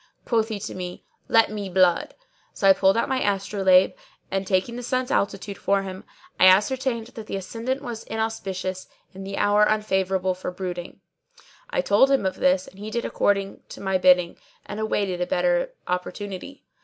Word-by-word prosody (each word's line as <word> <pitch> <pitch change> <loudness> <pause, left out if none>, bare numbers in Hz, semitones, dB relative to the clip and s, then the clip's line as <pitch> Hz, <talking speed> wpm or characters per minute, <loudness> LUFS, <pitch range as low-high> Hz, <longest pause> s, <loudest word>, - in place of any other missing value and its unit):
Quoth 225 -2 +1
he 215 -3 -4
to 210 - -5
me, 180 -1 -7 0.2
'Let 225 -2 +4
me 205 -2 -4
blood;' 180 -1 +2 0.4
so 195 - +1
I 195 - +9
pulled 190 +2 +3
out - - +1
my 265 -2 0
astrolabe 195 -2 +3 0.4
and, 195 0 -2
taking 190 +5 0
the 245 - -5
sun's 255 +1 -1
altitude 200 -2 -1
for 200 0 +1
him, 190 -1 -8 0.3
I 185 - +8
ascertained 235 +5 +3
that 225 -3 -10
the - - -4
ascendant 230 +8 -4
was 235 -4 -6
inauspicious 190 -4 -3 0.3
and 195 +1 -8
the 195 - -5
hour 205 0 +3
unfavourable 190 -3 +1
for 180 0 -5
blooding. 180 -1 -6 0.7
I - - 0
told 265 - +4
him 270 -7 +2
of 190 - -1
this, 185 0 +2
and 190 - -15
he 210 +1 -6
did 235 +2 -2
according 200 -1 0
to - - -9
my 190 -1 0
bidding 180 -1 +4 0.3
and 210 - -6
awaited 200 -4 -1
a 180 - 0
better - - +1 0.2
opportunity. 190 +7 -5
195 Hz, 180 wpm, -24 LUFS, 185-225 Hz, 0.7 s, I